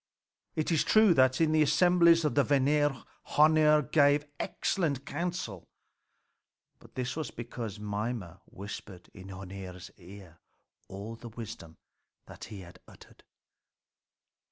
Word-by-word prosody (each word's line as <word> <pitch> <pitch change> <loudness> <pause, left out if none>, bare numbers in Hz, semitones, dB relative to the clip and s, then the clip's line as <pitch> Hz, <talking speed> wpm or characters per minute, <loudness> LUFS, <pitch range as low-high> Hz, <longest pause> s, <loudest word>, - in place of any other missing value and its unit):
It 155 +2 -1
is 160 - +3
true 215 -4 +5
that 130 -3 +3
in 160 -2 +3
the 155 0 +3
assemblies 170 +2 +4
of 150 - +1
the 145 - +3
Vanir 145 0 +1 0.3
Hœnir 150 -2 +4
gave 145 -1 +4
excellent 145 -8 -2
counsel. 155 - -4 1.1
But - - -19
this 125 0 -3
was 155 -2 -4
because 115 -3 -7
Mimer 105 -3 -4
whispered 100 -2 -10
in 95 -1 -12
Hœnir's 95 -1 -9
ear 90 -2 -14 0.5
all 100 +4 -8
the 120 - -10
wisdom 105 -8 -9 0.5
that - - -11
he 100 -3 -9
uttered. 85 0 -17
130 Hz, 120 wpm, -29 LUFS, 100-150 Hz, 1.1 s, true